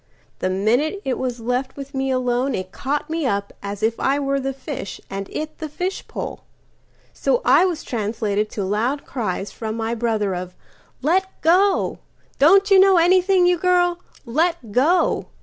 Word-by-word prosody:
The 185 - 0
minute 240 - +1
it 260 -2 -1
was 250 -2 -3
left 250 +4 -2
with 275 0 -8
me 270 0 -1
aloneIt 250 -6 -1
caught 285 +6 -2
me 320 -3 -1
up 200 -3 -2
as 200 +1 -6
if 225 +1 +1
I 275 +1 +2
were 275 -1 0
the 270 0 -2
fishAnd 200 -7 -7
it 310 0 -5
the 310 -2 -5
fishpole. 360 +6 -4 0.7
So - - +1
I - - +6
was 345 -4 -2
translatedTo 210 -2 -2
loud 235 +8 -1
cries 205 -6 -3
from 220 -1 -5
my 225 0 -2
brother 220 -4 0
of 180 0 -6 0.5
"Let 370 +6 +2 0.2
go! 375 +5 +3 0.4
Don't 390 +7 +5
you 390 - +8
know 385 -1 +6
anything, 365 +2 +4
you 355 -1 +3
girl? 355 -1 +2 0.3
Let 310 -1 0
go!" 305 - +2
265 Hz, 155 wpm, -21 LUFS, 220-340 Hz, 0.7 s, you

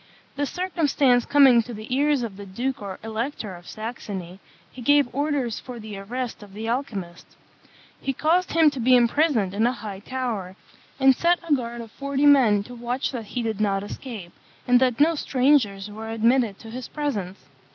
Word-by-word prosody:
The 285 0 -1
circumstance 295 -9 +1
coming 270 -5 +6
to 235 0 -8
the 215 +4 -4
ears 285 -2 +2
of 220 -4 -5
the 200 +1 -9
Duke 255 +8 -3
or 195 -2 -6
Elector 225 -1 -4
of 175 0 -14
Saxony, 200 -5 -6 0.3
he 255 - -10
gave 285 0 +3
orders 280 -5 -1
for 250 -2 -9
the 215 -1 -8
arrest 240 +4 -5
of 205 -2 -13
the 220 +2 -5
alchymist. 205 -9 -4 0.8
He 270 - -1
caused 330 +7 +1
him 320 -2 +5
to 275 - -6
be 250 +2 +5
imprisoned 240 - +2
in 220 +4 +2
a - - +2
high 205 -5 -7
tower, 220 -6 -4 0.4
and 265 -1 +6
set 345 +4 +3
a 310 - +3
guard 240 -3 -2
of 225 -2 -10
forty 280 +2 -1
men 245 -8 +5
to 245 - -11
watch 245 +2 -3
that 240 -4 -5
he 240 +4 -4
did 220 -2 -2
not 195 -2 +1
escape, 205 -5 -8 0.4
and 250 0 +6
that 255 -2 +1
no 315 +3 +5
strangers 255 -9 +2
were 220 +1 -7
admitted 225 -1 +2
to 225 - -11
his 250 +1 -6
presence. 205 -11 -3
240 Hz, 185 wpm, -24 LUFS, 210-275 Hz, 0.8 s, coming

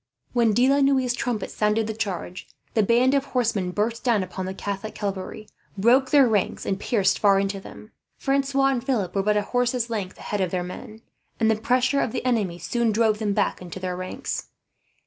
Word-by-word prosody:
When 235 -3 +3
De 245 +4 +4
la 280 +1 +3
Noue's 265 -3 +3
trumpet 240 -4 -3
sounded 210 +1 +1
the 220 - -3
charge, 195 -4 -4 0.3
the 220 - +3
band 240 +5 +3
of 280 -1 +2
horsemen 230 -8 0
burst 220 +5 -2
down 230 -6 +2
upon 185 0 -5
the 190 - -4
Catholic 200 +2 -5
cavalry, 200 +1 -5 0.3
broke 250 +6 +4
their 280 -3 +6
ranks, 210 -4 0
and 195 0 -1
pierced 200 -5 +1
far 200 -2 +4
into 195 0 -1
them. 215 +2 -12 0.3
Francois 275 0 +1
and 255 -3 -1
Philip 240 -9 -1
were 195 - +1
but 210 +1 +2
a 205 - +1
horse's 245 +1 0
length 200 -4 -4
ahead 205 -1 -3
of 185 - +1
their 180 0 -2
men, 215 +5 -9 0.4
and 225 -1 +3
the - - +2
pressure 250 +5 +1
of - - -2
the 250 - -3
enemy 210 -9 0
soon 230 +7 0
drove 215 -1 +2
them 210 -2 0
back 200 -2 0
into 180 +1 -8
their 185 -1 -3
ranks. 185 0 -5
220 Hz, 205 wpm, -24 LUFS, 195-245 Hz, 0.4 s, their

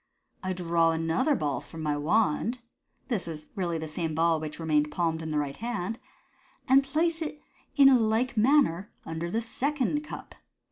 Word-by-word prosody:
"I 185 0 -2
draw 170 -2 +2
another 165 - +1
ball 145 - -1
from 160 -1 -9
my 150 -1 0
wand 205 - +1 0.3
" - - -44
(this 220 -9 -1
is 155 -2 -6
really 175 -4 -1
the 160 0 -5
same 160 0 -3
ball, 165 0 +3
which 155 -1 -6
remained 150 -2 +2
palmed 160 +1 -1
in 160 - -5
the 155 - -1
right 145 -2 -1
hand), 225 -2 -3 0.3
" - - -34
and 270 +1 +6
place 325 +4 0
it 300 -1 -4 0.4
in 280 -2 +8 0.2
like 245 +3 0
manner 220 - +3 0.2
under 165 +1 -4
the 225 +6 0
second 285 +5 -1
cup." - - -9
175 Hz, 180 wpm, -28 LUFS, 160-245 Hz, 0.4 s, in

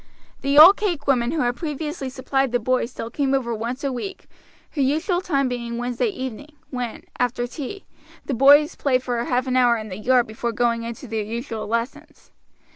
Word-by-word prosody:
The 275 +1 +1
old 345 +6 +10
cake 350 -9 -2
woman 250 -3 +2
who 315 -1 -1
had 245 0 0
previously 300 -2 -4
supplied 270 0 -1
the 245 - +1
boys 250 0 0
still 230 -2 -7
came 280 -2 -1
once 240 0 -2
a 275 -2 -1
week, 320 +11 -6 0.5
her 290 - -2
usual 320 +7 +1
time 275 -7 0
being 235 -1 -4
Wednesday 245 - -1
evening, 285 - -6 0.2
when, 245 -3 -4 0.2
after 245 0 0
tea, 290 +9 -7 0.4
the 280 - -2
boys 285 +4 +6
played 255 -3 +1
for 240 -2 -1
half 250 +1 0
an 255 -1 -1
hour 245 -2 +4
in 215 -1 -7
the 185 - -6
yard 245 +3 +3
before 230 +2 -4
going 235 +1 +1
in 230 0 -5
to 260 - -11
their 220 -1 -2
usual 225 +1 -5
lessons. 230 +4 -4
255 Hz, 195 wpm, -23 LUFS, 235-280 Hz, 0.5 s, old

